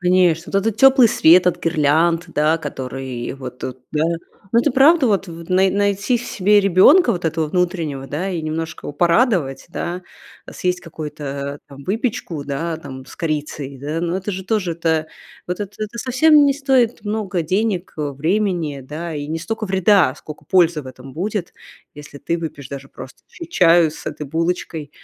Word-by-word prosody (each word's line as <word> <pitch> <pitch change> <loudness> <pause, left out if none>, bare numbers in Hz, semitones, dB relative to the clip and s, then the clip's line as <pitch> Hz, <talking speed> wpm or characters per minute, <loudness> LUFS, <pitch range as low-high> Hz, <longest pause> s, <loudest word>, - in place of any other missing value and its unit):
Конечно, 180 -2 +2
вот 195 - +3
этот 225 -2 0
тёплый 270 -2 +7
свет 175 +1 +5
от 180 - +1
гирлянд, 165 +2 +2
да, 155 +2 +2
который 130 -4 -5
вот 130 -2 -8
тут, 130 0 -6
да. 150 - +1 0.5
Ну, 235 - +6
это 295 - +1
правда 280 +3 +5
вот 200 -4 +1
вт 165 0 -10
най 190 +1 +3
найти 200 +4 +1
в 235 - -7
себе 205 -1 +3
ребёнка, 200 - +5
вот 175 -2 -5
этого 160 -1 0
внутреннего, 165 -5 -2
да, 160 +8 -3
и 175 -4 -3
немножко 160 +1 -4
его - - -5
порадовать, 170 - +1
да. 175 +1 -4 0.4
Э, - - -10
съесть 180 0 -1
какую-то, 155 -3 -8
э, 140 +1 -4
там, 140 0 -12
выпечку, 200 - -3
да, 160 +4 -3
там, 135 -4 -10
с - - -13
корицей, 150 -3 -4
да, 150 +4 -3
но 170 +1 -1
это 195 +2 -4
же 190 0 -5
тоже 195 -4 0
это, 160 -1 0 0.4
вот 180 +3 -4
это 205 0 -5
это 215 +2 -5
совсем 290 +5 +4
не 280 - +4
стоит 265 -5 +1
много 205 -3 -2
денег, 190 +2 -1
э, 150 -2 -2
времени, 165 -1 -1
да, 155 +5 -6
и 145 -1 -4
не 160 +1 -2
стока 225 +6 -4
вреда 190 -6 +3
сколько 155 0 -11
пользы 170 -2 +3
в 130 - -13
этом 130 +1 -11
будет, 195 +2 -3 0.4
если 145 -1 -11
ты 170 +4 -2
выпьешь 155 -5 -7
даже 135 0 -8
просто - - -12
ч 335 - -9
чаю 170 - +4
с 155 - -11
этой 150 - -5
булочкой, 160 -1 -2
170 Hz, 185 wpm, -20 LUFS, 150-200 Hz, 0.5 s, тёплый